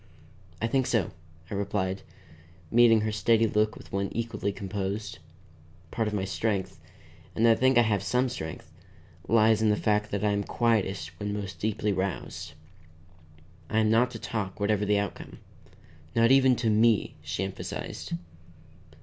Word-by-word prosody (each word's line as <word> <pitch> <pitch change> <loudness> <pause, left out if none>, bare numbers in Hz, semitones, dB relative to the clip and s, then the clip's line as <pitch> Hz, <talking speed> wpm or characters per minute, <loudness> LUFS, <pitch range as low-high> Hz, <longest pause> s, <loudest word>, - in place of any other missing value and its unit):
"I - - -1
think 130 +2 +1
so," 110 -8 +1 0.4
I - - -3
replied, 100 -1 -2 0.7
meeting 115 -2 +6
her 110 0 -1
steady 110 +2 +3
look 110 0 +1
with - - -13
one 100 0 -1
equally 115 -3 -2
composed. 100 0 -4 0.7
Part 110 -2 -1
of 105 - -3
my 95 -2 -1
strength 95 -1 -2 0.6
and 115 - +3
I 115 - +7
think 130 +2 +3
I 120 - +7
have 105 -3 +1
some 125 +6 +1
strength 80 -11 -7 0.6
lies 110 -1 +4
in 110 - +3
the 105 - +3
fact 105 0 0
that 100 0 -2
I 105 - +3
am 100 0 0
quietest 110 -4 -1
when 105 0 -3
most 100 -5 -5
deeply 105 0 0
roused. 95 -3 -4 1.2
"I 110 - -1
am 110 -1 +3
not 120 +2 +4
to 120 - -7
talk 105 -3 -4
whatever 105 0 +1
the 105 0 +2
outcome." 100 -2 -4 0.8
"Not 115 +1 +4
even 135 -1 +6
to 115 -2 0
me," 110 0 +3
she 95 - -3
emphasized. 95 0 -5
105 Hz, 160 wpm, -28 LUFS, 100-115 Hz, 1.2 s, I